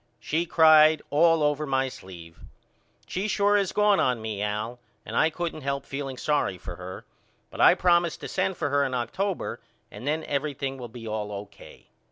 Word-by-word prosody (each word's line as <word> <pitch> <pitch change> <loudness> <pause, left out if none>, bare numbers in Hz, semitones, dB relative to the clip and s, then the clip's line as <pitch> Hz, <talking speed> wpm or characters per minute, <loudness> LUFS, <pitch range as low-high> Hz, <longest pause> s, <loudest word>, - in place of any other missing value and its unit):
She 165 +3 -1
cried 155 -2 +6
all 165 +1 +4
over 150 +1 0
my 135 -1 +1
sleeve. 85 -8 -11 0.7
She 190 +3 -3
sure 205 0 +2
is 200 -3 +1
gone 210 -1 +3
on 125 -2 +1
me 110 -2 -4
Al 105 +4 -3 0.3
and 110 - -7
I 160 - +4
couldn't 165 -1 -4
help 140 0 -3
feeling 135 -2 -5
sorry 145 -11 0
for 85 0 -9
her 90 +1 -8 0.5
but - - -4
I - - +7
promised 175 -2 +2
to - - -5
send 190 - -1
for 145 - -2
her 140 0 +3
in 130 -2 -2
October 180 - -3 0.3
and 130 - -9
then 155 +2 0
everything 140 -2 -3
will 120 - -6
be 115 0 -9
all 105 -1 -3
O.K. 100 0 -10
140 Hz, 185 wpm, -26 LUFS, 115-165 Hz, 0.7 s, I